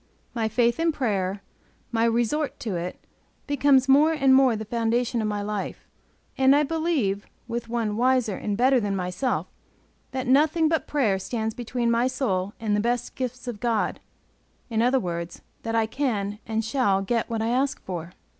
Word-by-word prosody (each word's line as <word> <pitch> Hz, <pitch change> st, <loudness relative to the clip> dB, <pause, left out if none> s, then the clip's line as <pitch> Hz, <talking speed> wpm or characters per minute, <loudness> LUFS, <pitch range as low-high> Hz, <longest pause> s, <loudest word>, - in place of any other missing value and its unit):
My 225 Hz, -2 st, 0 dB
faith 235 Hz, +3 st, +1 dB
in 330 Hz, 0 st, +3 dB
prayer, 200 Hz, -8 st, -1 dB, 0.5 s
my 230 Hz, 0 st, +2 dB
resort 240 Hz, +6 st, 0 dB
to 215 Hz, -6 st, -3 dB
it, 175 Hz, +1 st, -4 dB, 0.5 s
becomes 280 Hz, -2 st, +3 dB
more 295 Hz, +4 st, +5 dB
and 275 Hz, -4 st, +4 dB
more 260 Hz, -3 st, +5 dB
the 220 Hz, 0 st, -5 dB
foundation 235 Hz, +1 st, 0 dB
of 215 Hz, -, -1 dB
my 205 Hz, -1 st, -2 dB
life, 205 Hz, -1 st, -4 dB, 0.5 s
and 265 Hz, +1 st, +6 dB
I 295 Hz, -, +4 dB
believe, 295 Hz, -, -1 dB, 0.2 s
with 235 Hz, -1 st, -4 dB
one 225 Hz, -3 st, -1 dB
wiser 250 Hz, -4 st, +2 dB
and 205 Hz, +1 st, -3 dB
better 255 Hz, +2 st, +4 dB
than 205 Hz, -3 st, -1 dB
myself, 180 Hz, +7 st, -1 dB, 0.6 s
that 260 Hz, 0 st, -3 dB
nothing 305 Hz, +5 st, +4 dB
but 320 Hz, 0 st, 0 dB
prayer 225 Hz, -10 st, +1 dB
stands 220 Hz, +2 st, -3 dB
between 240 Hz, 0 st, -1 dB
my 235 Hz, +2 st, +2 dB
soul 205 Hz, -7 st, -1 dB
and 215 Hz, -2 st, 0 dB
the -, -, +1 dB
best 240 Hz, +2 st, -1 dB
gifts 255 Hz, 0 st, -5 dB
of 235 Hz, -4 st, -4 dB
God; 230 Hz, -2 st, 0 dB, 0.7 s
in 225 Hz, 0 st, +1 dB
other 250 Hz, +3 st, +3 dB
words, 170 Hz, -4 st, -5 dB, 0.2 s
that 225 Hz, 0 st, -3 dB
I 225 Hz, -1 st, +3 dB
can 210 Hz, -5 st, -2 dB
and 220 Hz, 0 st, -1 dB
shall 220 Hz, -5 st, +1 dB
get 230 Hz, +3 st, -1 dB
what 225 Hz, -1 st, -1 dB
I 225 Hz, -, 0 dB
ask 265 Hz, +3 st, 0 dB
for. 175 Hz, -1 st, -6 dB
235 Hz, 175 wpm, -25 LUFS, 210-260 Hz, 0.7 s, and